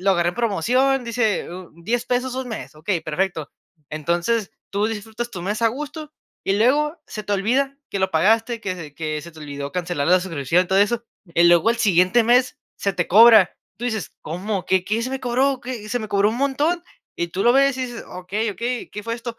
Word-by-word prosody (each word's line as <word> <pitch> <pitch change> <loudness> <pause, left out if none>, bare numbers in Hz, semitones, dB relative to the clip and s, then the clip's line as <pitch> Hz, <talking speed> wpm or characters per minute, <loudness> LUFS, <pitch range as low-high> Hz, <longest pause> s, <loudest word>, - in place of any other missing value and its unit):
lo 195 +1 +2
agarré 175 -2 +2
en - - -14
promoción, 245 +5 +1
dice 230 -3 0 0.4
$10 235 +4 0
pesos 250 +1 -1
un 260 -1 -4
mes. 225 - -7
Ok, 155 +4 -19 0.2
perfecto. 160 -1 -2 0.4
Entonces, 175 +8 -1 0.2
tú 205 +1 0
disfrutas 225 +2 -5
tu 180 - -7
mes 205 +5 -3
a 230 - +5
gusto 300 +5 -6 0.3
y 195 - +1
luego 300 +8 +2
se 215 - -6
te 205 - -3
olvida 255 +8 +1
que 200 - -2
lo 190 0 +1
pagaste 225 +7 +2
que 190 -4 -3
se 160 -5 -9
que 155 -1 -3
se 170 - -10
te 160 - -16
olvidó 140 -2 -6
cancelar 175 -4 -2
la 180 +1 +6
suscripción, 175 -1 0
todo 190 +2 +2
eso, 235 +3 +1 0.3
y 170 +1 +4
luego 175 +5 +5
al 235 - 0
siguiente 185 +1 +4
mes 250 +5 +3 0.2
se 200 - -1
te 175 -1 -1
cobra, 220 -2 +7 0.2
tú 240 - -5
dices: 220 -8 -3
"¿Cómo? 185 +3 -4
¿Qué 185 -1 +2
qué 215 +4 0
se 250 - -2
me 265 - -3
cobró? 260 +2 +1
¿Qué? 240 -4 -6
Se 245 +3 -1
me 215 - -6
cobró 200 0 +3
un 220 - -2
montón", 285 +6 0 0.3
y 170 - -2
tú 185 +3 -2
lo 240 - +6
ves 275 -1 +4
y - - -1
dices: 240 -2 -8
"Okey, 200 +5 -3
okey, 235 +5 -4
¿qué 210 - -7
fue 230 +2 -3
esto?". 235 0 -7
215 Hz, 215 wpm, -22 LUFS, 180-245 Hz, 0.4 s, cobra